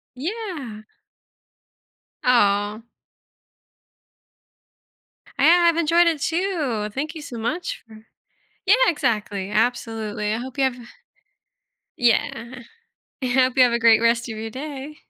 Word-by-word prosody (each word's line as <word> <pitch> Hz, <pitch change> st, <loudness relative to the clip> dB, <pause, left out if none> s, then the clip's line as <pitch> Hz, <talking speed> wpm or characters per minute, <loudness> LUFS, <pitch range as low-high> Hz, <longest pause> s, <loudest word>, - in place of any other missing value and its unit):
Yeah. 310 Hz, -, -5 dB, 1.4 s
Oh. 205 Hz, -3 st, +2 dB, 2.6 s
I -, -, +2 dB
have 340 Hz, 0 st, +5 dB
enjoyed 335 Hz, +1 st, +4 dB
it, 315 Hz, -4 st, 0 dB
too. 320 Hz, -, -1 dB
Thank 310 Hz, +4 st, -4 dB
you 310 Hz, -, -7 dB
so 250 Hz, -5 st, -8 dB
much 320 Hz, +11 st, -4 dB
for 220 Hz, 0 st, -15 dB, 0.6 s
Yeah, 395 Hz, -, +6 dB
exactly. 210 Hz, -, -1 dB
Absolutely. 220 Hz, -2 st, -1 dB
I 220 Hz, -, -1 dB
hope 260 Hz, +3 st, -8 dB
you 275 Hz, -, +2 dB
have 260 Hz, -, -1 dB, 1.2 s
yeah. 250 Hz, 0 st, 0 dB, 0.6 s
I -, -, -2 dB
hope 255 Hz, 0 st, +2 dB
you 255 Hz, -, +8 dB
have 245 Hz, -1 st, +3 dB
a 235 Hz, -, +1 dB
great 230 Hz, -1 st, +5 dB
rest 235 Hz, 0 st, +1 dB
of 220 Hz, -, -6 dB
your 225 Hz, +1 st, -5 dB
day. 280 Hz, +3 st, -7 dB
250 Hz, 120 wpm, -22 LUFS, 225-305 Hz, 2.6 s, you